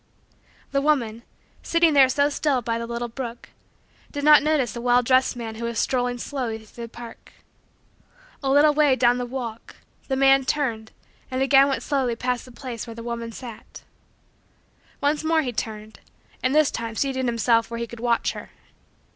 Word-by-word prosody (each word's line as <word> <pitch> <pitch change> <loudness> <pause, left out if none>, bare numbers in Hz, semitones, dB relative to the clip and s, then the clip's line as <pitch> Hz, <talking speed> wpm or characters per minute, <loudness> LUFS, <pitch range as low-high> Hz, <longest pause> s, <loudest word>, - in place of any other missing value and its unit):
The 275 - +1
woman, 240 -7 0 0.4
sitting 335 -2 +3
there 270 -2 +6
so 285 +2 +2
still 285 -3 0
by 230 0 -1
the 230 - -5
little 235 0 -3
brook, 235 0 -7 0.6
did 285 -1 -5
not 300 -1 +8
notice 290 -6 0
a 235 - -5
well 245 0 +3
dressed 255 +1 +3
man 230 -2 -6
who 230 +1 -6
was 235 -1 -3
strolling 245 0 0
slowly 245 -3 -4
through 225 +2 -10
the - - -12
park. 235 0 -12 1.1
A 270 - -1
little 290 +2 +5
way 295 -3 +4
down 245 -1 +3
the 245 - -3
walk, 235 -3 -6 0.3
the 265 - 0
man 270 0 +5
turned, 240 -6 -2 0.4
and 260 +1 0
again 275 0 +6
went 270 - -2
slowly 265 -5 0
past 250 +1 -2
the 255 - -13
place 240 -1 -7
where 230 - -8
the 230 - -8
woman 235 -1 -5
sat. 235 -1 -10 1.2
Once 290 +2 +1
more 320 0 +2
he 250 -3 -3
turned 215 -1 -6 0.4
and 255 +3 +1
this 310 -2 +4
time 230 -1 -5
seated 260 0 -1
himself 230 -1 +2
where 235 - -5
he 235 - -2
could 235 0 -11
watch 235 0 +1
her. - - -9
245 Hz, 180 wpm, -24 LUFS, 235-275 Hz, 1.2 s, not